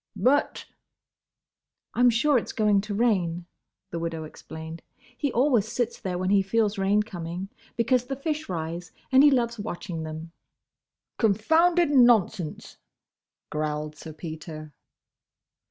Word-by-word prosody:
"But—!" 280 +4 +1 1.3
"I - - -5
'm 245 0 +7
sure 250 +4 +3
it's - - -7
going 210 -2 +3
to 205 0 -5
rain," 180 -7 +1 0.5
the 170 - -3
widow 165 -1 -3
explained. 160 +1 -9 0.3
"He 285 +2 -1
always 245 -4 +3
sits 240 -1 -2
there 185 -4 -2
when 185 +1 -1
he 200 -1 +5
feels 205 +1 0
rain 200 +2 +3
coming; 180 -1 -6 0.3
because 240 +2 +2
the 270 +2 -3
fish 305 +2 -3
rise, 170 0 -4 0.2
and 265 +1 +7
he 295 - +8
loves 235 -4 +1
watching 180 -4 -5
them." 160 +1 -7 0.9
"Confounded 320 - +3
nonsense," 230 - +3 0.7
growled 150 0 -2
Sir 160 +1 -9
Peter. 155 -1 -8
200 Hz, 130 wpm, -26 LUFS, 165-245 Hz, 1.3 s, he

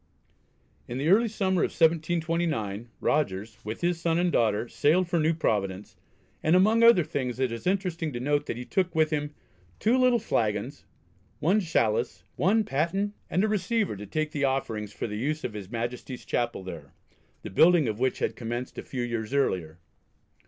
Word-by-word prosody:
In 120 - -5
the 145 +4 0
early 225 +5 +5
summer 190 -5 0
of - - +2
1729 160 - 0
Rogers, 110 -5 -1
with 110 +2 -6
his 175 -1 0
son 165 -1 +1
and 175 0 +2
daughter, 110 -3 +1
sailed 170 +9 +2
for 175 -1 +1
New 160 +1 +2
Providence, 100 - -1 0.5
and 160 +3 +3
among 215 +5 +4
other 230 -7 +7
things 130 -5 -3
it 130 -2 +1
is 115 +8 -5
interesting 180 -4 -1
to 120 - -4
note 145 +3 0
that - - -3
he 125 - -6
took 180 0 -1
with 155 0 +3
him 150 -1 -2 0.4
"two 230 +3 +2
little 250 -1 +4
flagons, 115 - -2 0.5
one 190 +7 +3
chalice, 120 - 0
one 215 +5 +3
paten, 190 +6 -1 0.2
and 185 +4 +1
a - - +3
receiver 210 - 0
to 105 +1 -8
take 155 +4 -2
the 145 -3 -2
offerings 115 -6 -1
for - - -5
the 105 -1 -4
use 155 +5 -2
of 115 - -3
his 100 -3 -7
Majesty's 120 +2 -5
Chapel 120 -5 -1
there," 80 -6 -9 0.5
the - - -7
building 160 - +5
of 110 0 -3
which 130 0 +1
had - - -1
commenced 120 +1 -5
a - - -3
few 125 -2 -4
years 115 +1 -3
earlier. 85 - 0
145 Hz, 180 wpm, -27 LUFS, 115-175 Hz, 0.5 s, other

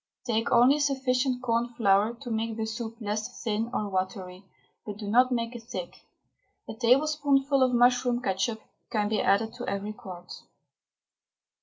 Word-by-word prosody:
Take 225 -1 0
only 250 +5 +5
sufficient 260 -2 0
corn 235 -1 +1
flour 205 +1 +3
to 245 -4 -6
make 225 0 -2
the 220 - -1
soup 225 0 -5
less 210 -1 -4
thin 220 +1 -1
or 210 -4 -2
watery, 185 -1 -4 0.4
but 210 -2 -7
do 210 -1 -7
not 250 +5 +4
make 235 0 -2
it 240 - -7
thick. 245 - -8 0.6
A - - -5
tablespoonful 275 +3 +2
of 255 -1 +4
mushroom 245 0 +3
ketchup 220 0 -2 0.3
can 210 -2 0
be 215 -1 +1
added 220 +3 +2
to 245 0 -7
every 200 +2 -3
quart. 180 -4 -10
230 Hz, 155 wpm, -27 LUFS, 210-250 Hz, 0.6 s, only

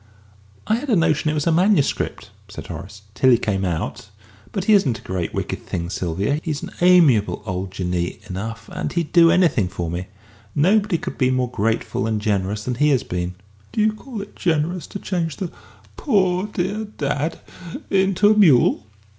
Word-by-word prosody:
"I 220 - +2
had 280 +4 -6
a 225 - +4
notion 160 -3 +2
it 155 - 0
was 150 - -1
a 170 - +3
manuscript," 175 -2 +1 0.2
said - - -8
Horace 100 +1 -9
"till 130 +4 +3
he 120 - +6
came 95 -4 -1
out. 90 +3 -3 0.4
But 195 - -2
he 215 - +4
isn't 145 - +3
a - - -15
great 90 -3 -3
wicked - - -4
thing, 85 +1 -4
Sylvia. 95 - -1
He's 155 -4 -3
an - - -6
amiable 165 - +4
old 95 -1 -3
Jinnee 90 -2 -3
enough. 110 +5 -6
And - - -3
he'd 170 -3 -2
do 170 -1 +6
anything 165 - +3
for 90 -3 -4
me. 90 +2 -4 0.5
Nobody 200 +4 +3
could - - -7
be 130 -2 +3
more 130 -1 0
grateful 110 0 -1
and 110 -1 0
generous 105 0 -1
than 125 - -2
he 150 - +5
has 135 -4 +2
been." 90 0 -4 0.4
"Do - - -3
you 215 0 +3
call 215 -1 -7
it 205 - -15
generous 170 +1 -1
to - - -6
change 170 -6 -2
the 185 -3 -4 0.5
poor, 190 - +1
dear 205 +2 -2
dad 150 -5 -3 0.5
into 195 +1 +3
a - - +4
mule?" 145 - +4
145 Hz, 185 wpm, -21 LUFS, -, 0.5 s, he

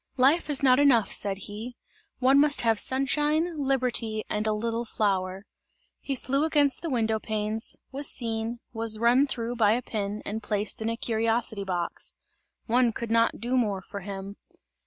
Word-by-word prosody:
"Life 280 +6 +3
is 285 -1 +3
not 255 -1 +5
enough," 255 -7 +3
said 195 -1 +3
he, 220 +4 -8 0.4
"one 265 +2 +4
must 295 -1 +5
have 225 -2 +2
sunshine, 295 +5 0
liberty 240 -5 -1
and 210 +1 -1
a - - +2
little 230 +2 -2
flower!" 195 -3 -2 0.5
He 275 - -4
flew 275 +3 -1
against 295 -3 +2
the 335 - -3
window 225 -4 0
panes, 215 +1 -2 0.2
was 280 +2 +2
seen, 230 0 0
was 225 -1 +1
run 245 +5 +3
through 240 -2 -4
by 215 -2 +4
a 245 +2 -2
pin 210 -2 -4
and 220 +2 -4
placed 210 0 -1
in 220 - -1
a 230 - -3
curiosity 225 -2 0
box; 180 -3 -3 0.5
one 245 0 +2
could 230 0 -5
not 230 0 +2
do 240 +4 -2
more 205 -6 0
for 200 - -8
him. 195 +1 -8
230 Hz, 170 wpm, -26 LUFS, 215-260 Hz, 0.5 s, not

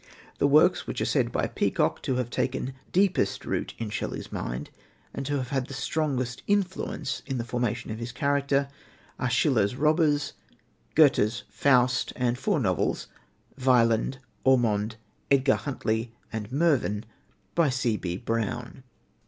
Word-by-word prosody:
The - - +4
works, 155 +6 +4
which - - -3
are - - 0
said - - +1
by - - 0
Peacock - - 0
to 130 - -1
have 125 -1 -2
taken 130 0 -1 0.2
deepest 185 - +2
root - - -2
in 110 -2 -4
Shelley's - - -4
mind - - -4 0.4
and 135 -1 -4
to 145 - 0
have 130 -2 -3
had 135 -2 -1
the 135 - -7
strongest 130 -2 -1
influence 190 -8 -1
in 135 -2 -2
the 120 - -2
formation 120 -1 -2
of 110 - -5
his 115 +1 -5
character, 140 +2 +1 0.5
are 130 - 0
Schiller's 120 -3 +2
Robbers, 150 0 +2 0.6
Goethe's 120 -8 +4
Faust, 130 -2 +3
and 125 -1 +1
four 175 +6 0
novels 95 - 0 0.5
Wieland, 120 0 +3 0.3
Ormond, 115 -4 +2 0.3
Edgar 135 -1 +4
Huntly, 115 -4 -2 0.2
and 110 0 -4
Mervyn 135 -9 +1 0.5
by 170 -4 +3
C.B. 115 -9 -1
Brown. 115 +2 -3
130 Hz, 140 wpm, -27 LUFS, 115-140 Hz, 0.6 s, The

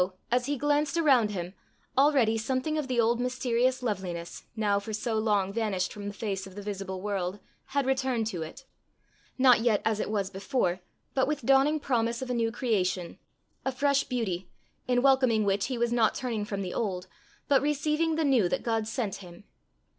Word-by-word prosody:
as 250 +1 +2
he 290 0 -1
glanced 290 +2 +1
around 265 -9 +4
him, 180 -3 -4 0.4
already 270 -5 +4
something 255 +7 -1
of 305 -3 -1
the 250 -2 0
old 235 +1 +3
mysterious 250 0 0
loveliness, 180 -6 -4
now 205 -2 +1
for 215 +2 -7
so 225 +2 -2
long 205 -3 +1
vanished 205 -5 -1
from 205 -1 -7
the - - -3
face 195 -2 -3
of 190 - -13
the 205 - -6
visible 195 -2 -5
world, 195 -2 -2 0.3
had 280 0 -1
returned 260 -3 0
to 185 -6 -3
it 165 +12 -8 0.7
not 255 -2 +6
yet 225 -3 +2
as 220 -1 +1
it - - -2
was 200 -2 -1
before, 195 -2 -1 0.3
but 265 -1 +2
with 290 -4 -2
dawning 275 +4 +4
promise 235 -4 0
of 260 -1 -4
a - - +1
new 230 -1 +1
creation, 190 -8 -1 0.4
a 265 - 0
fresh 280 +1 +2
beauty, 195 -8 -3 0.4
in 245 0 +2
welcoming 260 -5 +4
which 200 0 +1
he 255 -1 -3
was 235 0 +1
not 230 -2 +3
turning 230 -5 -2
from 200 -1 -3
the 180 - -4
old, 185 -5 -2 0.4
but 275 -2 +4
receiving 300 +2 +1
the 320 -1 +1
new 245 -10 +3
that - - -1
God 225 -2 0
sent 225 -4 -2
him. 175 -1 -12
230 Hz, 190 wpm, -28 LUFS, 200-265 Hz, 0.7 s, not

